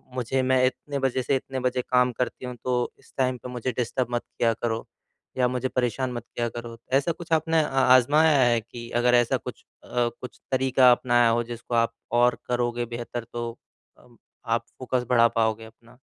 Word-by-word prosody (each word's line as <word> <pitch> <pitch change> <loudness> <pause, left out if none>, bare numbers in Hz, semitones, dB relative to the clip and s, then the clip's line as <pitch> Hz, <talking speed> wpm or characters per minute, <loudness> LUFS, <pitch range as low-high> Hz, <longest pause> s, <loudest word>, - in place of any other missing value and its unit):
मुझे 130 +1 0
मैं 130 0 +2
इतने 140 +2 -2
बजे 130 -1 0
से 135 - +1
इतने 130 0 -4
बजे 125 0 0
काम 125 0 +2
करती 125 +2 -4
हूँ 125 -1 -6
तो 125 -1 0
इस - - -23
टाइम 130 -1 +1
पे 125 - -9
मुझे 125 +1 -3
डिस्टर्ब 125 +1 -1
मत 120 - 0 0.2
किया 115 -1 +2
करो 115 0 -3 0.5
या 125 - +3
मुझे 125 +1 -1
परेशान 125 +1 -1
मत 120 -1 -6
किया 120 -1 -1
करो? 120 0 -8
ऐसा 140 +5 +2
कुछ 165 0 -9
आपने 160 0 +3
आ 135 -2 -1 0.2
आजमाया 150 +4 +4
है 120 -2 +4
कि 120 +1 -10
अगर 125 0 +4
ऐसा 120 -1 +3
कुछ - - -9 0.2
अ, - - -16 0.3
कुछ 125 - -9
तरीका 130 -1 +5
अपनाया 120 -1 +3
हो 120 +1 +1
जिसको 120 0 -6
आप 115 0 +2 0.3
और 125 0 +3
करोगे 120 -1 -1
बेहतर 120 0 -5
तो 120 0 -3 0.5
अ, - - -21 0.4
आप 115 0 0
फ़ोकस 125 -1 -3
बढ़ा 115 -2 +5
पाओगे 110 0 0
अपना? 115 +2 -18
125 Hz, 195 wpm, -25 LUFS, 120-130 Hz, 0.5 s, तरीका